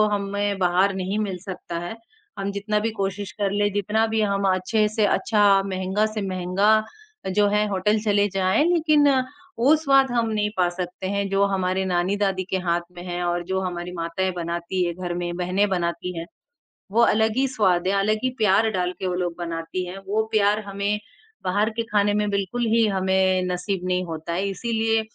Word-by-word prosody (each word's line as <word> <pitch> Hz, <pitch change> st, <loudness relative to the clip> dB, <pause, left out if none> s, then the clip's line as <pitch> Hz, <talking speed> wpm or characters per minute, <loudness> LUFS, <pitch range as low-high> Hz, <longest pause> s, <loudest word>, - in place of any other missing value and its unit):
हमें 200 Hz, 0 st, -2 dB
बाहर 185 Hz, +2 st, +3 dB
नहीं 190 Hz, +2 st, -2 dB
मिल 200 Hz, -4 st, -2 dB
सकता 180 Hz, -3 st, -5 dB
है। 200 Hz, -, -6 dB, 0.4 s
हम 195 Hz, 0 st, -2 dB
जितना 205 Hz, +1 st, -1 dB
भी 220 Hz, +2 st, -1 dB
कोशिश 200 Hz, -1 st, -3 dB
कर 200 Hz, -2 st, -1 dB
ले, 205 Hz, +1 st, +1 dB
जितना 210 Hz, +2 st, +1 dB
भी 220 Hz, 0 st, -1 dB
हम 200 Hz, -1 st, 0 dB
अच्छे 210 Hz, +4 st, +1 dB
से 215 Hz, 0 st, +1 dB
अच्छा 205 Hz, -2 st, +3 dB
महँगा 190 Hz, +2 st, 0 dB
से 215 Hz, 0 st, -3 dB
महँगा 185 Hz, +2 st, 0 dB, 0.7 s
जो 205 Hz, 0 st, +4 dB
है 210 Hz, +1 st, +2 dB
होटल 205 Hz, +2 st, +1 dB
चले 205 Hz, -1 st, +3 dB
जाएँ 195 Hz, +8 st, +2 dB
लेकिन 310 Hz, -4 st, +4 dB, 0.5 s
वो 275 Hz, +6 st, +5 dB
स्वाद 275 Hz, -4 st, +3 dB
हम 235 Hz, -2 st, +1 dB
नहीं 210 Hz, -1 st, 0 dB
पा 180 Hz, -1 st, +3 dB
सकते 180 Hz, +1 st, -5 dB
हैं 200 Hz, 0 st, -1 dB
जो 195 Hz, +1 st, +3 dB
हमारे 190 Hz, 0 st, 0 dB
नानी-दादी 190 Hz, +2 st, 0 dB
के 190 Hz, -, +2 dB
हाथ 170 Hz, 0 st, +2 dB, 0.2 s
में -, -, -6 dB
है 175 Hz, 0 st, -3 dB
और 175 Hz, 0 st, -1 dB
जो 190 Hz, +1 st, -1 dB
हमारी 180 Hz, -1 st, -4 dB
माताएँ 175 Hz, +2 st, -2 dB
बनाती 170 Hz, +1 st, -2 dB
हैं 170 Hz, -, -2 dB
घर 180 Hz, -1 st, -4 dB
में, 175 Hz, 0 st, -3 dB
बहनें 185 Hz, +3 st, +1 dB
बनाती 175 Hz, -1 st, -2 dB
हैं। 165 Hz, -, -5 dB, 0.7 s
वो 230 Hz, -, +3 dB
अलग 220 Hz, 0 st, +3 dB
ही 270 Hz, +1 st, +3 dB
स्वाद 190 Hz, -8 st, +1 dB
है, 195 Hz, -, +2 dB
अलग 215 Hz, +2 st, +2 dB
ही 255 Hz, -, +2 dB
प्यार 215 Hz, +1 st, +4 dB
डाल 180 Hz, -3 st, -1 dB
के 190 Hz, -, -2 dB
वो 180 Hz, -, -1 dB
लोग 175 Hz, -2 st, -2 dB
बनाती 170 Hz, +2 st, -4 dB
हैं। 180 Hz, +2 st, -7 dB
वो 215 Hz, +2 st, +1 dB
प्यार 210 Hz, 0 st, +3 dB
हमें 200 Hz, +1 st, -2 dB, 0.5 s
बाहर 205 Hz, +4 st, +1 dB
के -, -, +2 dB
खाने 205 Hz, 0 st, +3 dB
में 210 Hz, 0 st, 0 dB
बिल्कुल 200 Hz, +5 st, -1 dB
ही 230 Hz, -1 st, +4 dB
हमें 190 Hz, -1 st, +2 dB
नसीब 180 Hz, +1 st, -2 dB
नहीं 180 Hz, 0 st, 0 dB
होता 165 Hz, 0 st, -5 dB
है। 190 Hz, +3 st, -1 dB
इसीलिए 225 Hz, +2 st, 0 dB
195 Hz, 195 wpm, -23 LUFS, 180-210 Hz, 0.7 s, वो